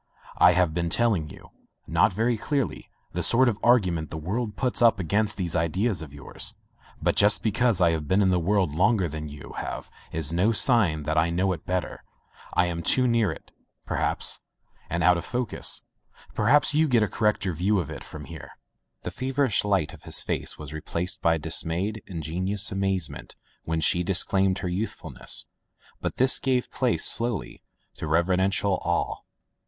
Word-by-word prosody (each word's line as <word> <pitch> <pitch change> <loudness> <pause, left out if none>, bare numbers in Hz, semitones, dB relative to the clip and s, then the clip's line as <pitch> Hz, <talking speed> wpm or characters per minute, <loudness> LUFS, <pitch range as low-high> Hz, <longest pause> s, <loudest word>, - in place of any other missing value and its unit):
I 90 0 +7
have 90 -3 +2
been 85 0 -1
telling 100 -7 +1
you - - -14 0.2
— - - -52
not - - +3
very 115 +5 0
cleverly 125 - -3
— - - -43
the - - -2
sort 130 +3 +3
of 110 -4 0
argument 90 -10 +2
the 80 - -6
world 105 +7 -3
puts 125 +1 -1
up 115 -3 +5
against 105 +4 0
these 85 -4 -2
ideas 90 +4 0
of 75 -3 -9
yours. 70 -2 -4 0.4
But - - 0
just 105 +1 +4
be 110 - +1
cause 115 -2 +1
I 85 -2 +4
have 80 -2 -3
been 95 +5 +3
in 95 - +3
the 90 - +2
world 90 -2 +1
longer 95 +3 +2
than 75 0 -6
you 75 0 -11
have - - -6 0.2
is 80 -1 -2
no 95 +7 +2
sign 105 - +2
that 80 +2 +1
I 80 +2 +2
know 90 +3 0
it 80 - -10
better. 90 -1 -3 0.5
I 90 - +4
am 85 -1 -3
too 125 +9 +3
riear 115 -4 +2
it, - - -11 0.3
perhaps - - -1 0.3
— - - -34
^and 85 +1 -1
out 90 -1 +5
of - - -7
focus. 125 -2 -2 0.5
Perhaps 140 +8 +3
you 155 +2 +3
get 120 -5 +3
a - - +1
correcter 105 -4 0
view 95 +6 +1
of 85 - -4
it - - -8
from 75 -1 -9
here.'' 80 -5 -11 0.5
The 90 - -4
feverish 130 +2 0
light 95 -7 0
of - - -13
his - - 0
face - - -2
was 75 -1 -9
replaced 85 +3 -4
by 80 0 +3
dismayed, 85 +6 -1
ingenuous 95 +4 -2
amazement 95 -10 -2 0.3
when 80 0 -1
she 90 +3 +3
disclaimed 95 +1 +2
her - - -1
youthfulness, 95 +5 -2 0.5
but - - -4
this 130 +1 +6
gave 130 -2 -1
place, 125 -3 +2
slowly, 115 -5 +2 0.4
to - - -5
reverential 95 +4 +1
awe. 85 0 -1
95 Hz, 185 wpm, -25 LUFS, 85-110 Hz, 0.5 s, I